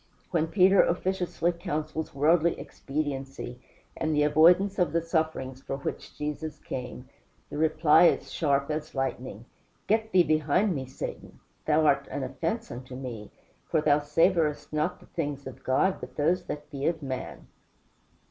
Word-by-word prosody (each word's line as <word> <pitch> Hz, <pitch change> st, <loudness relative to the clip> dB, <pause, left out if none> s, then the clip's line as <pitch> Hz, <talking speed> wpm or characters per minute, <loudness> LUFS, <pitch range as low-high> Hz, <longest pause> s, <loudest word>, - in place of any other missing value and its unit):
When 165 Hz, -2 st, +1 dB
Peter 190 Hz, +3 st, +5 dB
officiously 180 Hz, -1 st, 0 dB
counsels 160 Hz, -2 st, -4 dB
worldly 160 Hz, +4 st, +3 dB
expediency, 135 Hz, -3 st, -5 dB, 0.3 s
and 155 Hz, -1 st, -1 dB
the 150 Hz, -, +3 dB
avoidance 175 Hz, +7 st, +5 dB
of 175 Hz, -4 st, +2 dB
the 170 Hz, -, +2 dB
sufferings 160 Hz, -6 st, -2 dB
for 135 Hz, -, -4 dB
which 140 Hz, -, -6 dB
Jesus 150 Hz, +1 st, -4 dB
came, 125 Hz, 0 st, -7 dB, 0.4 s
the 145 Hz, -, -4 dB
reply 155 Hz, +1 st, +5 dB
is -, -, 0 dB
sharp 140 Hz, -2 st, +1 dB
as 155 Hz, 0 st, -4 dB
lightning: 130 Hz, -4 st, -3 dB, 0.4 s
"Get 220 Hz, +1 st, +1 dB
thee 185 Hz, -1 st, +6 dB
behind 155 Hz, +6 st, +2 dB
me, 135 Hz, -4 st, -4 dB
Satan; 130 Hz, -, -7 dB, 0.3 s
thou 155 Hz, 0 st, +4 dB
art 140 Hz, -1 st, +3 dB
an 140 Hz, -, -3 dB
offence 165 Hz, -, -3 dB
unto 125 Hz, +1 st, -8 dB
me; 120 Hz, -5 st, -7 dB, 0.4 s
for 160 Hz, -, +2 dB
thou 150 Hz, -1 st, +3 dB
savorest 155 Hz, +1 st, +1 dB
not 155 Hz, +4 st, -1 dB
the -, -, -15 dB
things 145 Hz, -4 st, -4 dB
of 130 Hz, -, -9 dB
God, 185 Hz, +9 st, +2 dB
but -, -, -9 dB
those 165 Hz, +5 st, +1 dB
that 150 Hz, +1 st, -7 dB
be 140 Hz, -1 st, -2 dB
of 160 Hz, -2 st, -1 dB
man." 130 Hz, -2 st, -5 dB
155 Hz, 155 wpm, -28 LUFS, 140-170 Hz, 0.4 s, thee